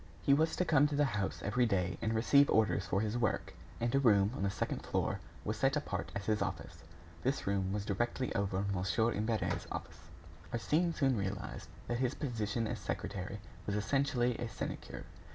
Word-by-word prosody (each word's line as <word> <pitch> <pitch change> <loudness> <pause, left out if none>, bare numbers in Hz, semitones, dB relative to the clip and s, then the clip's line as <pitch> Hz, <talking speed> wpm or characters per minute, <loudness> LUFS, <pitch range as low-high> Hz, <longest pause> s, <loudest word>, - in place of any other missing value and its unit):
He 140 - +5
was 160 +3 +3
to 180 - +1
come 150 -3 +5
to 145 - -2
the 145 0 +4
house 105 -7 -2
every 120 +4 +2
day 90 -4 0
and 110 0 0
receive 140 +5 +5
orders 105 -3 +3
for 95 +4 +1
his 110 +2 -1
work, 110 - 0 0.3
and 120 0 0
a 135 - +4
room 105 -6 +5
on - - -4
the 100 - +2
second - - -2
floor - - -1 0.3
was 105 +1 -1
set 135 +5 +2
apart 95 - -3
as 100 -1 -3
his 110 -1 +1
office. 85 -4 -4 0.4
This 135 +2 0
room 95 -1 0
was 100 0 -2
directly 120 +5 -1
over 100 -1 0
Mon. 95 +5 +1
Imbert's 110 +1 -1
office. 80 - -7 0.4
Arsène 160 +8 +1
soon 135 -3 +3
realized 100 -1 -4 0.2
that 120 0 -1
his 130 +1 +1
position 115 -4 -1
as - - -3
secretary 95 +2 -4 0.3
was 100 - 0
essentially 125 +1 +1
a 120 -1 -3
sinecure. 100 - -5
110 Hz, 190 wpm, -34 LUFS, 100-130 Hz, 0.4 s, He